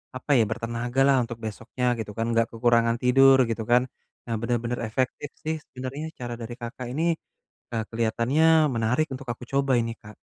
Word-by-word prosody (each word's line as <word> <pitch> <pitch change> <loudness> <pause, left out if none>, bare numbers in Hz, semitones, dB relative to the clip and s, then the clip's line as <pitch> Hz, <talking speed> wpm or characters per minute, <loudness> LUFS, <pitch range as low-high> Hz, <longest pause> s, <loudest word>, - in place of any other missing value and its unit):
apa 130 +3 -4
ya, - - +5
bertenaga 120 +3 -3
lah 135 - +5
untuk 115 0 -6
besoknya 115 +4 -4
gitu 105 -1 -4
kan 115 - 0
enggak 115 0 +2
kekurangan 115 0 +3
tidur, 135 +1 +6
gitu 115 0 -2
kan. 125 +1 +6 0.4
Nah 115 - -2
benar-benar 120 0 -1
efektif 130 +5 -2
sih 160 +1 -1
sebenarnya 130 +4 -6
cara 120 -1 -4
dari 115 +1 -6
Kakak 125 +1 -6
ini, 160 +4 -1 0.7
eee, 115 -1 -1
kelihatannya 115 +6 +1 0.3
menarik 115 +7 +1
untuk 130 0 -8
aku 125 - -13
coba 135 -1 +2
ini 115 0 -3
Kak. 105 0 -13
120 Hz, 175 wpm, -26 LUFS, 115-130 Hz, 0.7 s, tidur